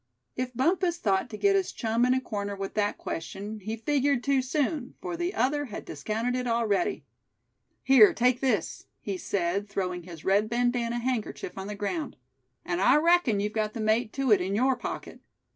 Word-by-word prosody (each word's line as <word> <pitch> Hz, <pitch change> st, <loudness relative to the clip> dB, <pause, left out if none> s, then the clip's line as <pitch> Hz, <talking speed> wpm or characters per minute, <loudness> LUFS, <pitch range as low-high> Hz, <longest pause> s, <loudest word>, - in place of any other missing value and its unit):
If 250 Hz, 0 st, -3 dB
Bumpus 345 Hz, +6 st, +1 dB
thought 195 Hz, -, 0 dB
to 215 Hz, -, -7 dB
get 395 Hz, -, +3 dB
his 385 Hz, -2 st, +1 dB
chum 230 Hz, +1 st, 0 dB
in 255 Hz, -, +3 dB
a -, -, +2 dB
corner 205 Hz, -5 st, -4 dB
with 195 Hz, 0 st, -5 dB
that 205 Hz, -1 st, 0 dB
question, 200 Hz, +6 st, -5 dB
he 215 Hz, +3 st, -5 dB
figured 275 Hz, +1 st, +1 dB
too 275 Hz, -1 st, +2 dB
soon, 270 Hz, 0 st, -2 dB
for 355 Hz, -2 st, -4 dB
the 345 Hz, +2 st, -2 dB
other 290 Hz, +5 st, +1 dB
had 215 Hz, -6 st, -7 dB
discounted 230 Hz, +3 st, -2 dB
it 250 Hz, 0 st, -2 dB
already. 235 Hz, -, 0 dB, 0.8 s
"Here, 260 Hz, -6 st, +7 dB
take 250 Hz, +1 st, +2 dB
this," 235 Hz, -10 st, -1 dB
he 200 Hz, -, -4 dB
said, 195 Hz, +2 st, -2 dB
throwing 180 Hz, -3 st, -2 dB
his 170 Hz, -2 st, -11 dB
red 205 Hz, +3 st, +3 dB
bandana 240 Hz, 0 st, 0 dB
handkerchief 240 Hz, -6 st, -3 dB
on 195 Hz, 0 st, -6 dB
the 210 Hz, -, -5 dB
ground; 255 Hz, -, -3 dB, 0.5 s
"and 175 Hz, +1 st, -1 dB
I 250 Hz, +7 st, +5 dB
reckon 320 Hz, -8 st, +3 dB
you've 210 Hz, +1 st, -2 dB
got 215 Hz, -1 st, -1 dB
the -, -, -6 dB
mate 220 Hz, +1 st, +1 dB
to 270 Hz, -3 st, 0 dB
it 200 Hz, -3 st, +6 dB
in 190 Hz, +2 st, -1 dB
your 260 Hz, +4 st, +3 dB
pocket. -, -, -6 dB
230 Hz, 190 wpm, -28 LUFS, 205-265 Hz, 0.8 s, Here